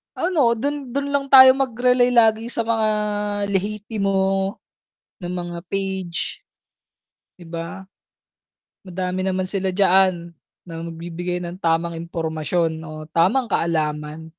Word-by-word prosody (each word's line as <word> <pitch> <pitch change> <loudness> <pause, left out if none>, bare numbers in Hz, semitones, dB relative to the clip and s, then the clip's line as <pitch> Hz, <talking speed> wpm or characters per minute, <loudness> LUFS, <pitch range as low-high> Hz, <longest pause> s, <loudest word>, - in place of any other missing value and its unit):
Ano, 305 -10 +2
dun, 280 +1 -4
dun 280 0 -2
lang 280 -1 0
tayo 260 -1 +10
mag-relay 250 -1 +2
lagi 225 -1 +4
sa 235 -1 0
mga 225 -1 +1 0.6
lehitimo 195 -1 -1 0.7
na 175 - -6
mga 175 -1 -5
page, 190 -3 -2 1.0
'di 175 - -12
ba? 165 +3 -6 1.0
Madami 185 0 -3
naman 185 0 -1
sila 190 -1 -1
diyaan, 185 -3 +3 0.3
na 165 -1 -7
magbibigay 170 +2 -5
ng 175 +3 -8
tamang 165 0 0
impormasyon 165 0 -2
o 155 -1 -8
tamang 195 +10 +3
kaalaman. 155 -3 -2
185 Hz, 115 wpm, -21 LUFS, 170-225 Hz, 1.0 s, tayo